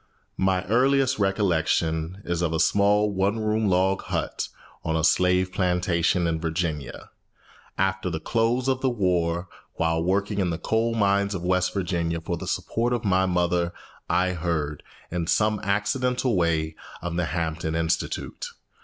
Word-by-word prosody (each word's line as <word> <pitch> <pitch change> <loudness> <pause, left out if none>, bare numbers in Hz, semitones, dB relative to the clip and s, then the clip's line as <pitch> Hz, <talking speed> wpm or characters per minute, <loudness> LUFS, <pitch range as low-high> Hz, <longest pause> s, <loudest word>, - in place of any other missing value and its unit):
My 95 -1 +1
earliest 130 +3 +2
recollection 90 -2 0
is 85 -1 -1
of 85 -2 0
a 80 - 0
small 105 +2 +3
one 100 +2 0
room 110 0 0
log 95 +1 +2
hut - - -3 0.4
on 80 0 -1
a 80 - 0
slave 90 +2 +3
plantation 90 -1 +1
in 80 -1 -1
Virginia. 80 -4 -3 0.7
After 95 0 0
the 80 -2 -3
close 115 +5 0
of 130 -1 +1
the 130 - +2
war, 90 -5 0 0.3
while 80 0 +1
working 100 +3 0
in 95 -2 +1
the 85 - -2
coal 115 +6 0
mines 100 -1 +2
of 90 - -4
West 90 0 +1
Virginia 85 -3 -1
for 85 +2 -3
the - - -7
support 120 +2 -1
of 120 -2 -2
my 95 -1 +3
mother, 90 -1 +1 0.4
I 90 0 +2
heard, 80 -4 -2 0.3
in 85 -1 -2
some 105 +2 +2
accidental 125 +5 0
way, 80 -3 +1 0.3
of 85 -1 -3
the 90 0 0
Hampton 80 -1 -2
Institute. 80 0 -2
90 Hz, 155 wpm, -25 LUFS, 85-100 Hz, 0.7 s, small